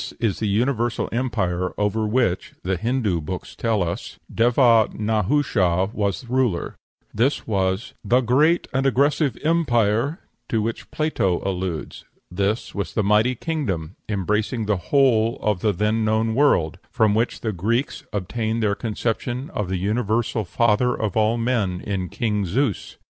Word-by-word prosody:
This - - -6
is 110 -5 -1
the 110 - -1
universal 120 +3 0
empire 100 -8 -1
over 105 +1 0
which, 110 -5 0
the 95 +1 0
Hindoo 110 -3 0
books 90 +4 -6
tell 110 -4 0
us, 85 0 -5 0.2
Deva 115 -1 +4
Nahusha 105 -3 +1
was 100 +3 -2
ruler; 125 -8 0 0.4
this 125 +7 +1
was 95 +2 -1
"the 125 +2 +3
great 145 +8 +3
and 135 +1 +2
aggressive 140 0 +2
empire" 135 -4 +2 0.3
to 115 - +1
which 110 +2 -3
Plato 125 - 0
alludes; 90 -4 -4 0.3
this 100 +5 -1
was 100 -1 -4
the 110 - +2
mighty 105 +5 +3
kingdom, 110 - -3
embracing 105 +3 -1
the 105 -1 +1
whole 120 -4 +3
of 105 -4 0
the 105 +3 +2
then 105 +4 0
known 110 +1 +1
world, 115 - +2
from 110 -2 +2
which 115 +3 0
the 110 - -1
Greeks 115 - -1
obtained 110 +3 -2
their 105 -1 +2
conception 120 +4 -3
of 105 -3 -3
the 95 - -1
universal 110 +3 0
father 115 +5 +2
of 105 -4 -3
all 110 +1 +2
men 115 -7 0
in 95 -2 -3
King 105 -4 -1
Zeus. 115 +3 -1
110 Hz, 150 wpm, -23 LUFS, 100-120 Hz, 0.4 s, Deva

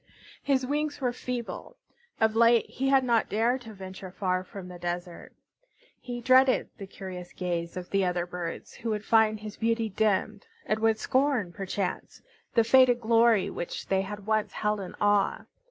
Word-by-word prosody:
His 265 -2 +1
wings 295 +2 -2
were 250 -3 0
feeble. 245 -1 -6 0.4
Of 220 0 +2
late 230 0 +5
he 270 +1 -2
had 270 -1 +4
not 235 -3 +2
dared 235 +5 +1
to 225 -2 -10
venture 190 0 -8
far 185 -1 -1
from 190 0 -9
the 180 -1 -10
desert. 175 0 -5 0.7
He 245 -1 -6
dreaded 255 +2 +4
the 195 - -7
curious 180 -2 -8
gaze 170 -1 -3
of 180 -1 -7
the 195 -1 +2
other 180 -1 0
birds, 175 -1 -6
who 230 - -5
would 210 -1 -2
find 220 -1 +3
his 215 0 -8
beauty 230 0 0
dimmed, 215 - 0 0.2
and 215 - 0
would 220 0 +2
scorn, 255 -6 +1
perchance, 195 0 -4 0.4
the 230 - +5
faded 245 +1 +5
glory 230 -2 +3
which 170 - -6
they 190 0 +2
had 205 +1 -7
once 215 0 0
held 210 -1 -1
in 190 - -7
awe. 205 -1 +2
215 Hz, 170 wpm, -28 LUFS, 190-240 Hz, 0.7 s, late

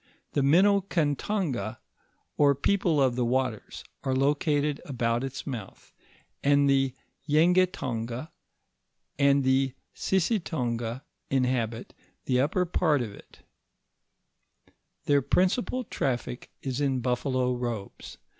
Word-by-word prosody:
The 145 - +1
Minokantongs, 165 - +1 0.6
or 140 -1 +4
people 170 +1 +1
of 130 -3 +3
the 125 - 0
waters, 125 -2 -2 0.2
are 130 -1 0
locate«l 145 +1 +1
about 120 -3 -1
its 135 -1 -5
mouth, 120 -9 -8 0.5
and 140 0 +4
the 135 -1 +2 0.3
Yengetongs, 150 -7 +1 0.9
and 140 0 +4
the 130 0 +2 0.2
Sissitongs, 130 - -1 0.3
inhabit 125 -3 -1 0.3
the 125 -1 +2
upper 170 +6 +1
part 155 -6 +1
of 110 - -6
it - - -15
(School - - -25 1.2
craft); - - -37
their 145 -1 +4
principal 210 - +1
traflic 125 -1 -3 0.2
is 135 0 -2
in 135 -3 +1
buffalo 125 +1 0
robes. 120 -5 -5
135 Hz, 110 wpm, -27 LUFS, 125-150 Hz, 1.2 s, or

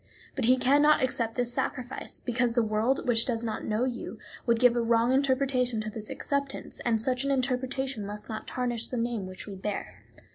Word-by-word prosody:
But 260 - 0
he 255 +2 +5
can 265 +3 +4
not 300 -2 +5
accept 230 -3 0
this 245 -1 0
sacrifice, 250 +1 -3
because 245 -1 +1
the 240 - +4
world, 220 +6 0
which 230 -2 +5
does 235 -2 -1
not 220 -2 -3
know 215 +2 0
you, 250 -2 -3 0.3
would 235 -1 +4
give 245 -1 +5
a 240 - +2
wrong 230 +2 +3
interpretation 260 -3 +2
to 215 0 -4
this 215 -1 -6
acceptance, 280 -1 -3
and 230 -2 +1
such 255 +3 0
an 275 - -1
interpretation 260 -2 -1
must 210 +1 -6
not 220 -1 -6
tarnish 240 -2 -2
the 250 - -4
name 230 -4 -1
which 185 -1 -7
we 205 - -7
bear. 195 +2 -4
245 Hz, 205 wpm, -28 LUFS, 225-260 Hz, 0.3 s, he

